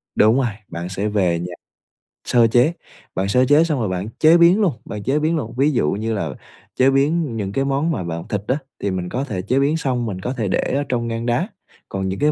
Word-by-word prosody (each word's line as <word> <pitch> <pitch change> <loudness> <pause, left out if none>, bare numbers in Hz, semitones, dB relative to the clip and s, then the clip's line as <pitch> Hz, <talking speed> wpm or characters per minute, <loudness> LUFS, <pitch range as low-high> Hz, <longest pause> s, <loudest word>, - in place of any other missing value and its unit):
Đúng 110 +2 +5
rồi, 125 - +1 0.2
bạn 85 +1 -6
sẽ 95 +3 -2
về 90 -5 +1
nhà 90 +1 -5 0.7
sơ 120 -2 +4
chế, 125 +8 +3 0.4
bạn 95 - 0
sơ 125 +6 +3
chế 145 +4 +5
xong 155 -5 -1
rồi 110 -4 -1
bạn 95 +3 -3
chế 160 +2 +6
biến 175 +5 +5
luôn, 185 -8 +2
bạn 105 -1 -6
chế 135 +7 +1
biến 160 +2 +1
luôn. 120 -8 -3
Ví 140 +3 +3
dụ 95 - +1
như 110 +3 -2
là 100 -7 -2 0.5
chế 130 +1 +4
biến 140 -1 +1
những 100 -3 -3
cái 135 +6 0
món 140 +4 0
mà 125 - -2
bạn 85 +1 -5
thịt 105 -4 -2
á, 130 - +1 0.2
thì 100 - -1
mình 90 -1 -3
có 130 - -2
thể 105 -10 -4
chế 125 +8 +1
biến 145 +3 +2
xong, 130 -6 -1
mình 95 -4 -4
có 125 - -3
thể 110 -4 -1
để - - 0
ở 140 +1 0
trong 120 -2 -1
ngăn 115 0 -3
đá, 120 +10 +1 0.4
còn 95 -1 -2
những 95 - -4
cái 150 +1 +3
120 Hz, 255 wpm, -20 LUFS, 100-140 Hz, 0.7 s, chế